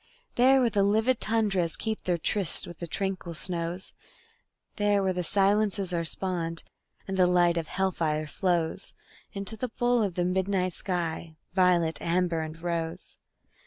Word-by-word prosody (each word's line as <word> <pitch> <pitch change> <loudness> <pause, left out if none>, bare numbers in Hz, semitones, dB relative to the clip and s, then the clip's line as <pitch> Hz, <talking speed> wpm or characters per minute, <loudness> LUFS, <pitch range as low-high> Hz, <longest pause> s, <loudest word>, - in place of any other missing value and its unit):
There 260 +2 +5
where 240 - +3
the 200 - +2
livid 220 +5 +3
tundras 205 -6 +1
keep 220 -1 -3
their 180 -1 +1
tryst 185 +1 -1
with 175 - -10
the 170 - -4
tranquil 185 -2 -3
snows; 170 +3 -1 0.8
There 205 -1 +2
where 190 -1 +1
the 180 0 -2
silences 200 0 +2
are 170 -1 0
spawned, 165 -1 -2 0.4
and 190 0 -3
the 180 -1 +5
light 175 -1 +4
of 165 -2 -2
hell 190 +2 0
fire 155 -3 -1
flows 175 +2 -1 0.4
Into 200 +2 -3
the 250 +3 -3
bowl 240 +1 +1
of 195 -5 -1
the 175 - 0
midnight 185 0 0
sky, 170 -3 -3 0.2
violet, 175 -3 +3
amber 170 -1 +1
and 160 +1 -6
rose. 165 -1 -4
180 Hz, 160 wpm, -28 LUFS, 170-200 Hz, 0.8 s, There